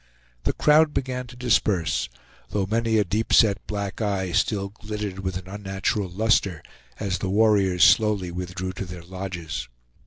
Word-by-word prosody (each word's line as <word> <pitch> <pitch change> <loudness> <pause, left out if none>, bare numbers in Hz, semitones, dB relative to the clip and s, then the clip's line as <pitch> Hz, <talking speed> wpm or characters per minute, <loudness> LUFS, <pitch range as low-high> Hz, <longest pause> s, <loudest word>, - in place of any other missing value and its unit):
The - - +1
crowd 150 0 +4
began 125 -1 -2
to 125 - -12
disperse, 105 -8 +1 0.4
though 100 -2 0
many 110 +2 +1
a 105 - +4
deep 105 +5 -2
set 105 -3 +5
black 100 0 -4
eye 95 -4 -1
still 100 +1 0
glittered 105 -2 -6
with 95 -1 -3
an 90 0 -9
unnatural 95 0 -2
luster, 100 -3 +1 0.4
as 95 -2 -2
the 95 - -2
warriors 100 -3 +3
slowly 105 -5 +4
withdrew 90 +1 -4
to 95 - -5
their 90 -1 -9
lodges. 85 -8 -5
100 Hz, 155 wpm, -24 LUFS, 95-110 Hz, 0.4 s, set